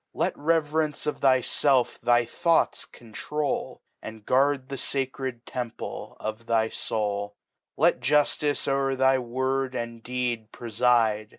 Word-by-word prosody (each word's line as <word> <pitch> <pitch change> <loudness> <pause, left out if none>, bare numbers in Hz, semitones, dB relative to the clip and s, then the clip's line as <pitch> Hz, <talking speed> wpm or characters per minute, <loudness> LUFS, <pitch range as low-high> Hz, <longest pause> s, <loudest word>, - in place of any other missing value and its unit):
Xet - - +1
Reverence 155 -1 0
of 150 - -2
thyfelf 130 0 +2
thy 120 0 +3
Thoughts 170 +7 +1
control^ 145 +6 -4 0.2
And 110 -1 -9
guard 135 0 +2
the 140 - -4
facred 130 -2 -3
Temple 120 -2 -6
of 110 +2 -5
thy 110 -1 +2
Soul. 105 -2 -3 0.4
Let - - +3
Juftice 150 0 +1
o'er 135 -1 +1
thy 130 0 +3
Word 130 +2 -1
and 115 -1 -5
Deed 120 -2 -3
prefide. 115 -2 +1
125 Hz, 120 wpm, -26 LUFS, 115-140 Hz, 0.4 s, thy